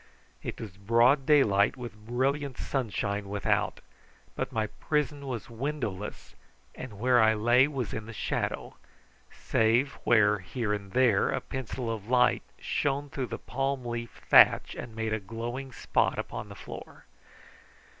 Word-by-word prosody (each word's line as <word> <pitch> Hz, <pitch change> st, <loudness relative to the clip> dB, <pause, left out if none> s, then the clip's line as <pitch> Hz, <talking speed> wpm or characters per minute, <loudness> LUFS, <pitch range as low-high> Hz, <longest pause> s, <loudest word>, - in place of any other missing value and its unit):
It -, -, -6 dB
was -, -, -6 dB
broad 120 Hz, +7 st, +3 dB
daylight 110 Hz, -7 st, +4 dB
with 110 Hz, -4 st, -9 dB
brilliant 135 Hz, +2 st, -1 dB
sunshine 100 Hz, -5 st, -2 dB
without, 100 Hz, 0 st, 0 dB, 0.5 s
but -, -, -3 dB
my 110 Hz, -1 st, 0 dB
prison 145 Hz, +4 st, -2 dB
was 120 Hz, -5 st, -4 dB
windowless, 115 Hz, -5 st, -5 dB, 0.4 s
and 120 Hz, -6 st, -8 dB
where 125 Hz, +2 st, +4 dB
I 110 Hz, 0 st, +5 dB
lay 120 Hz, +5 st, +4 dB
was 130 Hz, -8 st, -4 dB
in 110 Hz, 0 st, -5 dB
the -, -, -7 dB
shadow, 110 Hz, -, -3 dB, 0.5 s
save 115 Hz, +5 st, +1 dB
where 105 Hz, -2 st, +4 dB
here 105 Hz, +3 st, -3 dB
and 100 Hz, -2 st, -5 dB
there 120 Hz, -6 st, +4 dB
a -, -, 0 dB
pencil 125 Hz, -2 st, -4 dB
of 105 Hz, -2 st, -7 dB
light 125 Hz, -1 st, +4 dB, 0.2 s
shone 140 Hz, 0 st, -1 dB
through 130 Hz, -3 st, -3 dB
the -, -, -5 dB
palm 135 Hz, 0 st, -2 dB
leaf 120 Hz, -1 st, -5 dB
thatch -, -, +6 dB
and 115 Hz, -2 st, -8 dB
made 110 Hz, -1 st, -2 dB
a 110 Hz, -, 0 dB
glowing 120 Hz, +6 st, -5 dB
spot -, -, 0 dB
upon -, -, -5 dB
the -, -, -9 dB
floor. -, -, -10 dB
120 Hz, 145 wpm, -29 LUFS, 105-130 Hz, 0.5 s, thatch